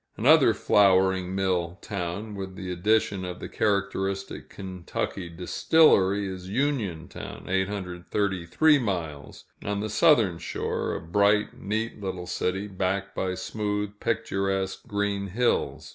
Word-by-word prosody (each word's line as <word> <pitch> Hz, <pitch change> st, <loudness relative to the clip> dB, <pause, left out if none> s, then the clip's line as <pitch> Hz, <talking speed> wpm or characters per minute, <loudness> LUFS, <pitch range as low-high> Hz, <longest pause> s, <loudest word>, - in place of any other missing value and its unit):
Another -, -, +6 dB
flouring 95 Hz, -2 st, +3 dB
mill 90 Hz, -2 st, 0 dB
town, 100 Hz, +2 st, -4 dB
with 95 Hz, -2 st, -6 dB
the 95 Hz, -2 st, -5 dB
addition 100 Hz, +1 st, +1 dB
of 90 Hz, -1 st, -5 dB
the -, -, -6 dB
characteristic 100 Hz, -2 st, -1 dB
Kentucky 95 Hz, -1 st, -5 dB
distillery, 100 Hz, -, +3 dB
is 95 Hz, -1 st, -7 dB
Uniontown 110 Hz, -, -3 dB
(833 95 Hz, -, +1 dB
miles), 85 Hz, -, -4 dB, 0.2 s
on 100 Hz, 0 st, -2 dB
the 110 Hz, +1 st, -3 dB
southern 110 Hz, -, +4 dB
shore -, -, -2 dB
a -, -, -3 dB
bright, 100 Hz, +5 st, +2 dB
neat 110 Hz, +2 st, -3 dB
little 95 Hz, -2 st, -4 dB
city, 95 Hz, +3 st, -2 dB
backed 95 Hz, 0 st, -2 dB
by 95 Hz, -1 st, -2 dB
smooth, 105 Hz, 0 st, -2 dB
picturesque 95 Hz, -4 st, -1 dB
green 100 Hz, -1 st, -1 dB
hills. 120 Hz, +6 st, 0 dB
95 Hz, 115 wpm, -26 LUFS, 90-105 Hz, 0.2 s, Another